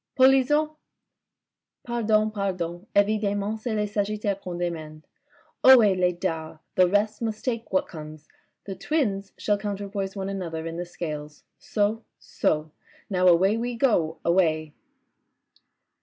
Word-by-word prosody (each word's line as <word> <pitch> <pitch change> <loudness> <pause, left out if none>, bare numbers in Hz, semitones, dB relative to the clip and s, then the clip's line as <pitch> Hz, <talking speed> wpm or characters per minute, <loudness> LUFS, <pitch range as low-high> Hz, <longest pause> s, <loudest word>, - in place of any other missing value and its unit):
..." - - -61
Polisson! 270 +4 +4 0.3
" - - -60
" - - -64
Pardon, 220 -2 +1
pardon. 185 -2 -3
Evidcmment, 205 +1 +1
c'est 220 0 -3
le 210 0 +1
Sagittaire 205 -1 -1
qu'on 180 -2 -6
demande. 160 -3 -4 0.6
Ohe, 235 -7 +8
les 180 -1 +2
dards! 165 -3 -4 0.2
The 185 -1 +5
rest 210 +3 +1
must 220 -2 -3
take 235 -3 -2
what 185 - +1
comes. 155 -1 -10 0.4
The 195 - -5
Twins 200 - -1
shall 205 -1 0
counterpoise 200 -1 -4
one 195 -1 -3
another 170 -5 -4
in 165 0 -5
the 175 - -3
Scales. 150 -4 -6 0.2
So, 215 +2 -1
so. 155 0 -1 0.4
Now 185 -1 +3
away 190 +5 +5
we 240 +1 -2
go, 195 - +1
away." 160 -3 +2
195 Hz, 140 wpm, -25 LUFS, 170-215 Hz, 0.6 s, Ohe